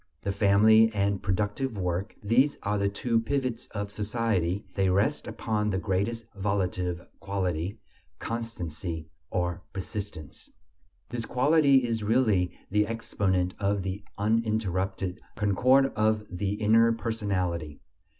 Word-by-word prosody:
The 100 - 0
family 110 +3 +5
and 100 -1 +1
productive 105 +5 -1
work: 90 +2 -2
these 125 +7 +3
are 105 0 0
the 100 0 +2
two 115 +3 0
pivots 125 0 -2
of 100 -1 -5
society; 105 -3 -1
they 95 -1 +2
rest 100 +11 +1
upon 105 -2 -1
the 95 - 0
greatest 100 +4 -1
volitive 90 -3 -1
quality: 95 0 -2 0.4
constancy, 85 -8 -5 0.2
or 90 -1 -1
persistence. 95 - -6 0.6
This 120 -1 -4
quality 140 0 +4
is 115 -2 -1
really 105 -5 +2 0.2
the 105 +1 +3
exponent 95 -5 0
of 100 -1 0
the 95 +2 -4
uninterrupted 100 -4 0
concord 130 +7 +3
of 110 0 +2
the 95 +2 -1
inner 110 +2 +4
personality. 95 -9 -2
100 Hz, 120 wpm, -28 LUFS, 95-115 Hz, 0.6 s, family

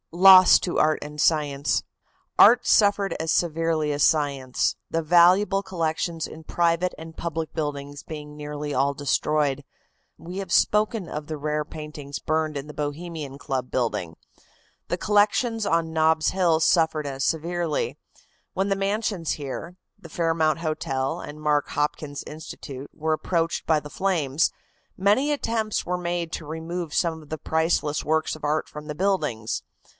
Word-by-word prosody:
LOSS 185 +1 +8
TO 175 - -3
ART 155 0 +3
AND 150 0 -5
SCIENCE. 145 -3 +1 0.5
Art - - +7
suffered 200 -3 +3
as 160 0 -1
severely 165 -3 +1
as 145 - +1
science, 140 -4 +1
the 165 0 -1
valuable 180 +4 +5
collections 165 -3 -2
in 160 - -11
private 170 +2 +1
and 160 0 -10
public 165 -1 -4
buildings 145 -2 -4
being 150 -1 -8
nearly 150 0 -5
all 140 +2 +2
destroyed. 145 0 0 0.5
We 175 +3 -8
have 190 -3 -6
spoken 210 -1 +2
of 150 -1 -6
the 155 - -4
rare 150 +1 -1
paintings 150 -2 -7
burned 155 -1 -1
in 140 +1 -6
the 150 - -9
Bohemian 150 -1 -5
Club 130 -2 -3
building. 90 -10 -2 0.7
The - - 0
collections 215 +2 +2
on 165 -1 0
Nob's 160 0 +3
Hill 175 -4 +2
suffered 160 -2 +2
as 135 -1 -3
severely. 165 0 -1 0.6
When 190 +1 0
the 195 - +2
mansions 195 -3 -1
here, 150 +5 -6 0.2
the 185 -5 -13
Fairmount 165 -1 +1
Hotel 135 -5 -2
and 150 +1 -9
Mark 150 -1 +1
Hopkins 145 -1 -2
Institute 145 -3 -8
were 160 0 -1
approached 165 +1 -1
by 160 -2 +4
the 150 0 -10
flames, 165 -6 +1 0.5
many 210 +10 +3
attempts 225 -6 -1
were 180 0 -1
made 175 -2 -3
to 160 - -4
remove 160 +1 -5
some 165 -2 0
of 150 - -17
the 155 - -3
priceless 160 -2 0
works 160 +1 0
of 155 - -14
art 150 +1 0
from 150 0 -10
the 150 - -5
buildings. 150 - -1
160 Hz, 150 wpm, -25 LUFS, 150-175 Hz, 0.7 s, LOSS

